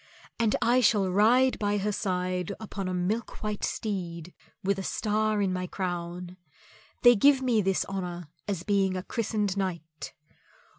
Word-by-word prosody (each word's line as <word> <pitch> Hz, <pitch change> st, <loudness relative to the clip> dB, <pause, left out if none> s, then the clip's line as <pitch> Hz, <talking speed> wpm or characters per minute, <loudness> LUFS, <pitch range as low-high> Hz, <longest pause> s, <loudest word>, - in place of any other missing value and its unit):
And 225 Hz, -2 st, +2 dB
I 245 Hz, +2 st, +4 dB
shall 205 Hz, -4 st, +3 dB
ride 240 Hz, +7 st, +4 dB
by 205 Hz, 0 st, +1 dB
her 205 Hz, +1 st, 0 dB
side 185 Hz, -2 st, -2 dB
upon 200 Hz, -3 st, -5 dB
a -, -, -2 dB
milk 205 Hz, +7 st, -2 dB
white 210 Hz, -1 st, -3 dB
steed 175 Hz, -5 st, -3 dB, 0.3 s
with 195 Hz, 0 st, +1 dB
a -, -, -4 dB
star 215 Hz, +1 st, 0 dB
in 190 Hz, -2 st, 0 dB
my 180 Hz, 0 st, -3 dB
crown; 175 Hz, -1 st, -4 dB, 0.7 s
they 245 Hz, 0 st, +8 dB
give 270 Hz, +5 st, +5 dB
me 235 Hz, -4 st, +3 dB
this 195 Hz, -1 st, +1 dB
honour 180 Hz, -3 st, -5 dB, 0.2 s
as 190 Hz, -4 st, -2 dB
being 195 Hz, -2 st, +1 dB
a 180 Hz, -, -4 dB
christened 210 Hz, -3 st, -1 dB
knight. 165 Hz, -5 st, -4 dB
195 Hz, 155 wpm, -28 LUFS, 180-215 Hz, 0.7 s, they